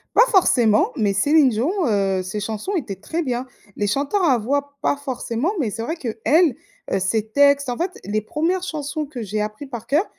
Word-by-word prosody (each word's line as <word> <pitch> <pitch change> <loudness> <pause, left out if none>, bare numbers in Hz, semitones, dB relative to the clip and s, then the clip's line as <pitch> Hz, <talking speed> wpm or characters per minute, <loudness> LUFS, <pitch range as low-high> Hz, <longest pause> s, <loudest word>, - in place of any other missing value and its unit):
Pas 475 - +7
forcément 240 - +4
mais 215 -7 +1
Céline 285 +7 +4
Dion, 235 +8 0 0.2
heu, 195 -3 +1
ses 185 +3 -4
chansons 220 - -3
étaient 240 - -3
très 320 - -3
bien. 250 -2 -2 0.3
Les 205 - -1
chanteurs 285 - 0
à 270 -8 +4
voix, 280 +5 -2
pas - - +2
forcément, 265 - -2
mais 235 -8 0
c'est 225 +2 -5
vrai 315 +8 -2
qu'elle, 275 +3 +2 0.4
heu, - - +2
ses 215 +3 -1
textes 280 +1 +4
en 245 - -2
fait, 360 +2 -3
les 215 +1 -1
1res 325 - -1
chansons 305 -3 -4
que 255 -5 -6
j'ai 210 +1 -2
appris 215 +6 -5
par 240 -4 -8
coeur, 305 +9 +2
255 Hz, 200 wpm, -21 LUFS, 215-300 Hz, 0.4 s, Pas